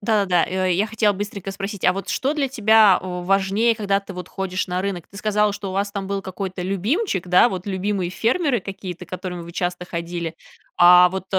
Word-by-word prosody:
Да-да. 200 -5 +2
Э, 185 0 0
я 200 +5 +1
хотела 215 -1 +1
быстренько 200 -1 -5
спросить, 195 0 -6
а 180 - +5
вот 195 +1 -6
что 275 +3 0
для 285 -3 -1
тебя 220 -5 +5
важнее, 195 +5 +1
когда 200 -2 0
ты 195 -1 -10
вот 180 - -7
ходишь 190 -1 -3
на 180 0 -2
рынок? 190 -4 -4
Ты 200 - -15
сказала, 210 -1 +1
что 205 -1 -6
у - - -5
вас 200 +1 -1
там 195 -2 -4
был 195 0 -3
какой-то 185 -1 -5
любимчик, 195 - -1
да, 180 +7 +6
вот 185 -1 -5
любимые 190 -1 -1
фермеры 245 - +1
какие-то, 185 -2 -7
к - - -24
которым 180 -2 -5
вы 170 - -10
часто 180 0 -3
ходили. 170 -1 -5 0.4
А 180 +1 +8
вот 190 0 -4
195 Hz, 205 wpm, -22 LUFS, 180-210 Hz, 0.4 s, А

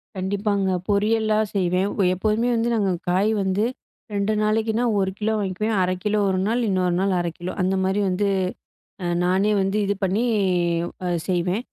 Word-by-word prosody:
கண்டிப்பாங்க. 200 +1 -1 0.2
பொரியல்லா 215 +1 +2 0.2
செய்வேன். 185 +1 +1
அ, - - +4
எப்போதுமே 215 +5 0
வந்து 230 +1 +1
நாங்க 200 -4 +1 0.2
காய் 195 +5 +2
வந்து 190 +2 0 0.5
2 200 +1 0
நாளைக்குனா, 220 +2 +1 0.2
1 190 0 0
கிலோ 220 +1 0
வாங்கிக்குவேன். 210 +3 -1
1/2 185 0 0 0.3
ஒரு 190 -1 +1
நாள், 240 +2 +1
இன்னொரு 180 -2 +1
நாள் 195 0 +1
1/2 170 -1 -2
கிலோ 175 +1 -4
அந்தமாரி 190 +2 +1
வந்து 195 +3 0 0.8
அ, - - -1 0.2
நானே 190 +4 +2
வந்து 195 +2 0
இது 200 +1 0
பண்ணி 195 +3 +1 0.8
அ - - -1 0.2
செய்வேன். 180 +5 0
195 Hz, 155 wpm, -23 LUFS, 185-215 Hz, 0.8 s, அ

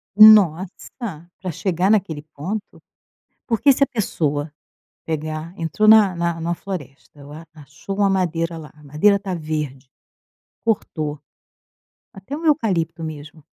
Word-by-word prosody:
Nossa! 195 - +4
Pra 185 -1 -3
chegar 180 +3 0
naquele 185 -8 0
ponto. 195 +9 -6 0.7
Porque 245 +4 +4
se 275 - +3
a - - +2
pessoa, 150 -10 -2 0.5
pegar 155 +1 -4
entrou 165 +6 0
na 215 -4 +7
na 170 -1 -2
na 170 +1 -1
floresta, 150 -7 -9
ela 145 +3 -11
achou 150 +6 -9
uma 200 -1 +3
madeira 170 -3 -1
lá, 155 -2 -10
a 150 - -19
madeira 155 +8 +3
tá 195 -2 -5
verde. 150 -5 -5 0.7
Cortou. 155 -9 -2 0.9
Até 195 +9 -7
um 325 - -8
eucalipto 180 - +1
mesmo, 155 0 -9
170 Hz, 130 wpm, -21 LUFS, 155-200 Hz, 0.9 s, na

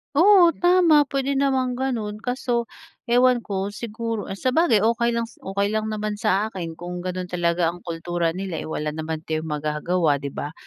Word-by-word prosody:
Oo, 350 +1 +6
tama, 350 -4 +5
pwede 275 0 -1
namang 265 -2 +1
ganun 225 -5 -3
kaso 245 -2 -2 0.4
ewan 245 0 +4
ko, 200 -1 -3
siguro, 230 -1 -4
eh, 195 - -5
sabagay 260 - +3
okey 235 +1 +2
lang 235 0 -1
s 230 - -18
okey 200 +2 -1
lang 215 0 -1
naman 215 0 -2
sa 195 +3 +2
akin 165 -3 -6
kung 175 +1 -6
ganun 185 0 -4
talaga 170 -1 0
ang 175 - -12
kultura 170 0 -2
nila, 185 0 -4
eh, - - -7
wala 150 -1 -3
naman 160 0 -5
tayong 160 0 -3
magagawa, 150 0 0
'di 140 - -4
ba? 145 +2 -6
205 Hz, 180 wpm, -23 LUFS, 170-245 Hz, 0.4 s, Oo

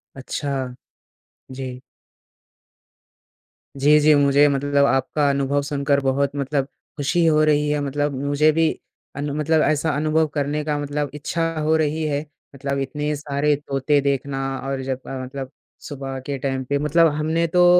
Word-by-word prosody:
अच्छा। 140 +2 -4 1.0
जी। 130 -1 -6 2.0
जी, 150 +2 +5
जी, 150 +1 +5
मुझे 145 +1 +5
मतलब 140 0 +2
आपका 140 +2 +1
अनुभव 140 +1 +1
सुनकर 140 0 0
बहुत 135 +1 +1
मतलब 140 0 -1 0.3
खुशी 165 +4 +1
हो 155 -1 +4
रही 150 -1 +3
है। 150 0 +1
मतलब 145 +1 -1
मुझे 145 +2 +3
भी 160 +1 +2 0.5
अनु 145 0 -3
मतलब 155 +1 +2
ऐसा 155 +1 +1
अनुभव 155 +1 +2
करने 150 +1 -1
का 150 -1 0
मतलब 145 0 -2
इच्छा 155 +3 -2 0.2
हो 155 +1 +2
रही 155 +1 0
है। 145 0 -1 0.3
मतलब 140 0 -3
इतने 150 +2 -2
सारे 145 0 0
तोते 140 0 0
देखना 140 0 -1 0.3
और 135 -1 -2
जब 130 0 -3
अ, 130 -1 -5
मतलब 135 +1 -7 0.4
सुबह 135 -2 -5
के 140 -1 -3
टाइम 135 0 -2
पे। 140 +2 0
मतलब 165 +3 +4
हमने 160 +2 0
तो 175 +2 +4
145 Hz, 150 wpm, -22 LUFS, 140-150 Hz, 2.0 s, जी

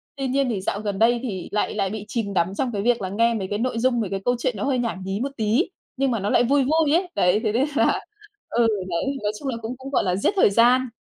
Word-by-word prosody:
tuy 270 -1 -3
nhiên 270 0 +1
thì 210 -5 -2
dạo 195 - -2
gần 205 -2 -3
đây 235 +2 +4
thì 195 -8 -5
lại 210 - 0
lại 195 -2 0
bị 210 0 -6
chìm 215 -4 -3
đắm 185 +1 0
trong 260 -3 0
cái 205 -3 -2
việc 235 0 +2
là 190 - -3
nghe 230 +4 +2
mấy 200 -4 -3
cái 205 +2 -3
nội 235 -1 -1
dung, 245 0 +2
mấy 205 - -3
cái 195 - -2
câu 245 - +2
chuyện 250 +1 0
nó 200 - -3
hơi 270 -2 +1
nhảm 230 -6 -2
nhí 195 +2 -3
một 275 +3 -2
tí, 225 - +1 0.3
nhưng 270 0 +1
mà 230 - 0
nó 200 +1 -2
lại 240 - +4
vui 275 +3 +3
vui 305 +2 +2
ấy. 355 +3 +2
Đấy, 180 +3 +3
thế 215 - +1
nên 245 +5 +2
là - - +3 0.5
ừ, 235 0 +2 0.2
đấy, 170 -1 -1 0.2
nói 205 - +1
chung 285 - -6
là 250 -3 -2
cũng 225 +3 -5
cũng 265 +1 -8
gọi - - +2
là 180 -3 0
giết 200 - +1
thời 380 - +5
gian. 245 +5 +4
230 Hz, 295 wpm, -23 LUFS, 200-255 Hz, 0.5 s, thời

